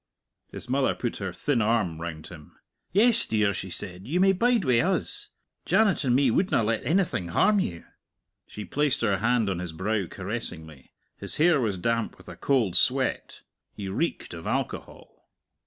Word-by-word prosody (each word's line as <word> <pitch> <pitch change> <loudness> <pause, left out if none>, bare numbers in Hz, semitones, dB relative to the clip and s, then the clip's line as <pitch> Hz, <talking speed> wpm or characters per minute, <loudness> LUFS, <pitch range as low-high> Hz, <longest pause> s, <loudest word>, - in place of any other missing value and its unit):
His - - -8
mother 135 +1 +1
put 120 - -3
her 95 -2 -4
thin 130 - -1
arm 105 -7 0
round 80 -2 -6
him. 80 -4 -13 0.4
"Yes, 230 +4 +4
dear," 105 -2 +1
she 95 - -6
said; 90 +1 -7
"you 170 +6 0
may 195 +1 +5
bide 230 +1 +2
wi' 125 -3 +3
us. - - 0 0.3
Janet 195 -2 +2
and 125 -2 +2
me 135 -2 +3
wouldna 145 -4 +2
let 110 0 -1
anything 165 - 0
harm 205 - +3
you." 85 - -3 0.6
She 105 - -8
placed 145 -2 +1
her 100 -5 +1
hand 115 0 +1
on 95 -3 -2
his 90 -2 -5
brow 95 +2 -1
caressingly. 80 - -6 0.3
His - - +2
hair 155 -2 +3
was 105 -5 -1
damp 115 +4 -1
with - - -15
a - - -9
cold 120 -10 +1
sweat. 130 +5 +1 0.3
He 100 -2 -5
reeked 165 - -3
of 85 -1 -8
alcohol. - - -5
115 Hz, 170 wpm, -26 LUFS, 95-145 Hz, 0.6 s, may